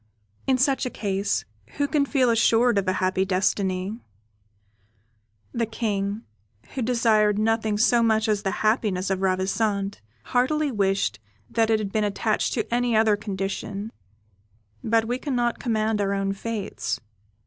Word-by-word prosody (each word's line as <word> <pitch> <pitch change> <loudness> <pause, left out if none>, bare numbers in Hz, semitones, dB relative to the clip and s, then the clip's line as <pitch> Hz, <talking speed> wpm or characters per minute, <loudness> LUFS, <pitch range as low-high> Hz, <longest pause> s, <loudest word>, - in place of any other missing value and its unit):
In 265 -1 +3
such 260 0 +2
a - - -2
case, 200 -3 -1 0.3
who 285 0 +1
can 285 -1 +1
feel 260 -4 +3
assured 230 0 +4
of 195 - -4
a 185 - +2
happy 185 0 +1
destiny? 190 +2 0 1.5
The 230 -2 0
King, 210 -2 -2 0.5
who 265 - -3
desired 220 -3 +3
nothing 220 -1 +1
so 235 +2 +4
much 220 -1 +2
as 210 -2 +1
the 195 - -1 0.2
happiness 205 -4 +1
of 190 0 -1
Ravissante, 195 +2 0 0.2
heartily 290 +4 +1
wished 195 - 0 0.3
that 225 -1 +2
it 220 - +4
had 210 -2 -4
been 215 0 +1
attached 210 +1 0
to 230 -1 -2
any 240 -1 +1
other 220 -1 +4
condition, 200 +1 -4 0.9
but 225 0 +2
we 245 +2 -2
cannot 245 -4 -1
command 220 -2 0
our 200 0 0
own 195 0 -1
fates. 210 0 -4
215 Hz, 145 wpm, -25 LUFS, 195-235 Hz, 1.5 s, assured